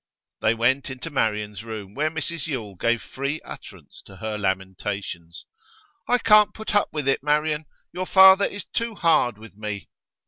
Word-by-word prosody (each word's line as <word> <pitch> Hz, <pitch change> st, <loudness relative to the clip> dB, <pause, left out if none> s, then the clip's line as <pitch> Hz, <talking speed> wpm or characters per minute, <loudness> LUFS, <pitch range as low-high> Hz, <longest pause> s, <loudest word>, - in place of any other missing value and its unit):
They 110 Hz, +1 st, +3 dB
went 130 Hz, +5 st, +1 dB
into 130 Hz, +5 st, -7 dB
Marian's 105 Hz, -5 st, -1 dB
room, 110 Hz, -3 st, -7 dB
where 150 Hz, +5 st, 0 dB
Mrs 160 Hz, +1 st, -3 dB
Yule 115 Hz, -9 st, -4 dB
gave 115 Hz, +5 st, 0 dB
free 140 Hz, +3 st, -4 dB
utterance -, -, -12 dB
to 95 Hz, -, -13 dB
her 110 Hz, +3 st, -4 dB
lamentations. 95 Hz, -3 st, -4 dB, 0.6 s
'I 245 Hz, -, +4 dB
can't 215 Hz, -3 st, +5 dB
put 220 Hz, 0 st, -5 dB
up 205 Hz, -, +3 dB
with 150 Hz, -3 st, -3 dB
it, 135 Hz, -, +2 dB
Marian! 150 Hz, +1 st, 0 dB, 0.3 s
Your 185 Hz, 0 st, -4 dB
father 190 Hz, +1 st, +8 dB
is 205 Hz, -2 st, -5 dB
too 230 Hz, -1 st, -3 dB
hard 145 Hz, -, +2 dB
with 110 Hz, -1 st, -14 dB
me. 105 Hz, -1 st, -6 dB
130 Hz, 165 wpm, -24 LUFS, 105-165 Hz, 0.6 s, father